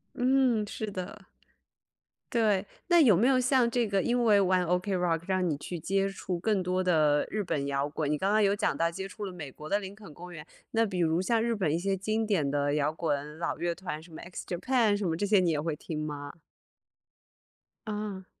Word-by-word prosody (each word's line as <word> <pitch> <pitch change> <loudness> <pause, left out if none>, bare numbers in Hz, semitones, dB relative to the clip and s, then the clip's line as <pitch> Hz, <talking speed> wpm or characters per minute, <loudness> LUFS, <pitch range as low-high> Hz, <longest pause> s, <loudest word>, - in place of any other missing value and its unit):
嗯， 250 -3 +2
是 215 +1 -4
的。 185 -1 -7 1.0
对， 215 -5 +2 0.3
那 345 -1 +6
有 220 - +6
没 230 +7 +3
有 265 -1 +4
像 255 -1 +3
这 240 -1 +1
个， 195 -2 +1
因 240 0 +1
为 210 -3 +6
玩 185 -1 +3
OK 180 +3 0
Rock， 170 -3 0
让 185 -1 +1
你 150 - -1
去 170 +4 -6
接 195 +4 0
触 190 -2 -4
更 210 +1 +1
多 185 +1 0
的 155 -5 +3
日 215 - -1
本 145 -6 -2
摇 140 +1 -1
滚？ 150 0 -2
你 150 - 0
刚 195 - +1
刚 215 +1 +4
有 200 0 +3
讲 205 - 0
到 165 0 +1
接 190 +3 -5
触 205 +2 -7
了 190 - -6
美 155 -6 -7
国 150 +3 -10
的 200 +5 +1
林 195 -1 -8
肯 205 -7 -13
公 180 +3 -10
园， 155 -3 -9 0.3
那 225 0 +2
比 190 -4 -3
如 165 -1 +2
像 225 +5 +1
日 230 0 0
本 185 -8 0
一 165 - 0
些 195 +2 -1
经 215 +3 -1
典 170 -10 +1
的 145 0 +1
摇 150 +1 +1
滚 150 -1 -3
老 170 - -2
乐 175 0 -1
团， 170 -4 -6
什 165 +1 -16
么 - - -8
X 175 +1 -8
JAPAN 220 +4 +1
什 205 -1 -2
么 165 - 0
这 205 - 0
些 205 0 +4
你 180 -2 +2
也 155 -2 0
会 155 0 -2
听 155 0 -6
吗？ 145 -1 -6 1.6
嗯。 210 -3 -4
185 Hz, 265 characters per minute, -29 LUFS, 160-210 Hz, 1.6 s, 那